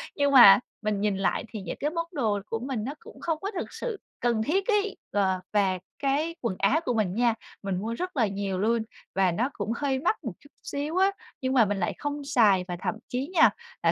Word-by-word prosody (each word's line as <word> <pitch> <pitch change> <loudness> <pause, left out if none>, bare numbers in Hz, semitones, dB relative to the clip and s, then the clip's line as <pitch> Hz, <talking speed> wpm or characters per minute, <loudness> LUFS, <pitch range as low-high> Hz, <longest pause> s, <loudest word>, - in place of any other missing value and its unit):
Nhưng 285 -1 +2
mà, 240 -7 +10 0.2
mình 215 -2 -1
nhìn 205 -2 +1
lại 195 - 0
thì 215 - -6
những 185 - -5
cái 295 - 0
món 335 +1 -2
đồ 220 - 0
của 225 - -3
mình 250 -3 -3
nó 270 +5 -3
cũng - - -14
không 325 -2 -1
có 400 - -3
thực 375 - -5
sự 455 -5 -4 0.2
cần 235 -2 +1
thiết 375 - 0
ấy. 415 -2 +1
Ờ, 190 -2 +1
và 190 -3 +2 0.2
cái 295 +5 0
quần 230 -6 -1
áo 260 +11 +3
của 250 - +1
mình 210 -5 0
nha, 235 0 +3 0.3
mình 195 -2 -1
mua 220 +4 -3
rất 360 +4 -4
là 225 -4 +3
nhiều 195 -1 -3
luôn 225 +2 +2 0.3
và 190 -2 +3
nó 240 +10 0
cũng 210 +1 -3
hơi 270 0 0
mắc 350 - 0
một 230 -8 -4
chút 285 - -19
xíu 295 +4 -3
á, 385 +1 +4 0.3
nhưng 260 0 0
mà 240 -4 +6
mình 205 0 -1
lại 175 - 0
không 290 0 -4
xài. 215 -9 +4
Và 175 - -3
thậm 220 - -1
chí 255 +3 -2
nha 325 - +7 0.3
là - - +5
235 Hz, 235 wpm, -27 LUFS, 205-290 Hz, 0.3 s, mà